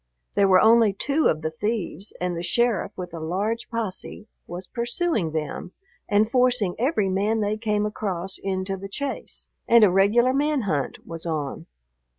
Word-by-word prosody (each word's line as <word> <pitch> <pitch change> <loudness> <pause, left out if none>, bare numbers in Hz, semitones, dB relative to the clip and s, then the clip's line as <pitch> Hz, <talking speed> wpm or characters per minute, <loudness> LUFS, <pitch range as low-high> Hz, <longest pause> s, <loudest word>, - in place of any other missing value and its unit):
There 200 -1 +4
were 185 -1 +6
only 225 -2 +5
two 285 +10 +1
of 155 0 0
the 160 - -1
thieves, 205 +1 -3
and 180 -1 -1
the 170 - -3
sheriff 235 +5 0
with 180 -2 -6
a 165 - -5
large 200 +8 -2
posse 215 -1 -4 0.2
was 175 +2 -6
pursuing 235 - -1
them 155 +3 -4 0.4
and 210 +1 +4
forcing 250 -6 +2
every 240 -5 +1
man 205 +4 +1
they 210 +1 0
came 210 -1 0
across 195 -3 -3
into 195 0 -2
the 195 +1 -8
chase, 280 +7 -4 0.2
and 235 -1 +7
a 200 - +6
regular 215 +7 +4
man 290 0 +1
hunt 150 - -2
was 165 0 -6
on. 150 -4 -3
205 Hz, 165 wpm, -24 LUFS, 180-230 Hz, 0.4 s, and